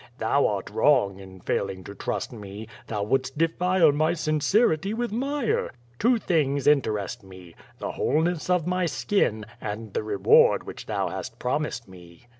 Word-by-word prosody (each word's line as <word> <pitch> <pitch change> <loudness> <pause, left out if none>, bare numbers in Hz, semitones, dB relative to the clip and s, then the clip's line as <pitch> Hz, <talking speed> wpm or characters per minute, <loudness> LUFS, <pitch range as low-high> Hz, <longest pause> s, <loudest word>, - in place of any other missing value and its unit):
Thou - - +2
art - - -3
wrong 100 -1 +3
in 95 -1 -12
failing 95 -1 -2
to 100 - -9
trust 100 - -4
me. 105 -1 -8 0.2
Thou 105 -2 -2
wouldst 130 +5 -1
defile 170 +1 +3
my 155 +3 +1
sincerity 165 +5 +1
with 240 -1 -2
mire. 270 +2 -1 0.3
Two 240 +2 +4
things 145 -9 0
in 145 -1 +6
terest 105 +1 -4
me, 95 -3 -13 0.2
the - - -4
wholeness 160 +4 0
of 180 -3 +2
my 180 0 0
skin, 140 - 0 0.2
and 110 0 -5
the - - 0
reward 105 -2 +4
which - - -9
thou - - -1
hast - - -6
promised 125 -2 -2
me." 90 +2 -15
140 Hz, 160 wpm, -25 LUFS, -, 0.3 s, in